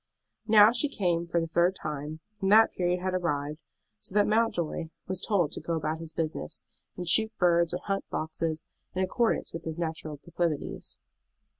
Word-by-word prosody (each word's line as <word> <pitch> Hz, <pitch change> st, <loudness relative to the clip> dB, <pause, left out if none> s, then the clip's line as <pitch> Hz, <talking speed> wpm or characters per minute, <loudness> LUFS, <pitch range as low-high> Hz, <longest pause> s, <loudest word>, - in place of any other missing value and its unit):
Now 215 Hz, 0 st, +8 dB
she 255 Hz, +5 st, 0 dB
came 175 Hz, -8 st, 0 dB
for 170 Hz, 0 st, +1 dB
the 165 Hz, -, 0 dB
third 175 Hz, +3 st, +2 dB
time, 150 Hz, -1 st, -5 dB, 0.2 s
and 195 Hz, 0 st, +1 dB
that 220 Hz, +1 st, +7 dB
period 180 Hz, 0 st, 0 dB
had 185 Hz, 0 st, -1 dB
arrived, 150 Hz, -4 st, -1 dB, 0.4 s
so 185 Hz, -, -7 dB
that 205 Hz, -1 st, +5 dB
Mountjoy 210 Hz, -8 st, +1 dB, 0.2 s
was 185 Hz, -1 st, -2 dB
told 180 Hz, -8 st, +1 dB
to -, -, -5 dB
go 170 Hz, -, -2 dB
about 155 Hz, 0 st, -2 dB
his 165 Hz, -1 st, -5 dB
business, 155 Hz, -, -3 dB, 0.3 s
and 180 Hz, -1 st, -5 dB
shoot 220 Hz, +5 st, +4 dB
birds 170 Hz, -2 st, +3 dB
or 180 Hz, +1 st, -3 dB
hunt 195 Hz, -1 st, -2 dB
foxes, 160 Hz, 0 st, -2 dB, 0.3 s
in 185 Hz, -, +1 dB
accordance 230 Hz, +4 st, 0 dB
with 165 Hz, 0 st, -6 dB
his 160 Hz, 0 st, -5 dB
natural 160 Hz, -2 st, -4 dB
proclivities. 170 Hz, 0 st, -3 dB
170 Hz, 175 wpm, -28 LUFS, 160-190 Hz, 0.4 s, Now